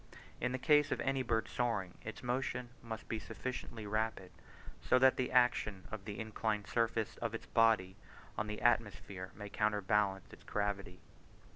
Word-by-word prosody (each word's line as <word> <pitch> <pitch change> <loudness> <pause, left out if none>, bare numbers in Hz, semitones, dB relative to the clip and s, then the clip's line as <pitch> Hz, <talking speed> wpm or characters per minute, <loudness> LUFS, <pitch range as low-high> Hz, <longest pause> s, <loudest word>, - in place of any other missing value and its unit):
In 125 - 0
the 130 - -1
case 150 +1 +4
of - - 0
any 135 -1 +1
bird 115 -3 0
soaring, 110 -7 -1
its 110 - -7
motion 125 0 -1
must 115 -1 -6
be 110 - -2
sufficiently 120 -1 -5
rapid 110 -3 -1 0.5
so 130 - +4
that 130 0 +6
the 130 - -1
action 115 -6 +3
of 105 -3 -6
the 105 -1 -5
inclined 110 -1 -1
surface 115 -2 0
of 115 -1 -2
its - - -6
body 110 -5 +3 0.4
on 110 - -2
the 105 0 -5
atmosphere 100 -5 +1
may 105 0 -7
counterbalance 105 -2 +1
its - - -13
gravity. 100 -3 -2
110 Hz, 160 wpm, -35 LUFS, 100-120 Hz, 0.5 s, that